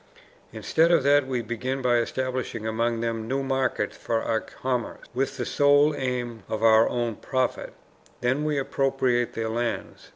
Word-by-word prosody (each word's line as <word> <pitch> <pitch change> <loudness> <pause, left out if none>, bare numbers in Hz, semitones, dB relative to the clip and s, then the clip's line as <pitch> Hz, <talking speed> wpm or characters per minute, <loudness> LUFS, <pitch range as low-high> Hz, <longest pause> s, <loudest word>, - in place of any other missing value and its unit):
Instead 165 +1 +2
of 170 -5 +4
that 140 -1 +4
we 125 -3 -2
begin 125 +4 -3
by 125 -2 +2
establishing 125 -1 -2
among 115 +1 0
them 115 -1 -2
new 135 +3 -1
markets 135 -1 -1
for 115 -1 -2
our 110 -1 +1
commerce, 125 -1 -4
with 135 +1 -1
the 120 - -2
sole 145 +3 +4
aim 125 -4 -3
of 110 0 -3
our 110 0 +6
own 120 -2 -1
profit; 130 +2 -2 0.5
then 130 +4 +1
we 150 -1 0
appropriate 135 -3 0
their 115 0 -2
lands, 120 +1 -3
i. - - -21
125 Hz, 165 wpm, -25 LUFS, 115-135 Hz, 0.5 s, our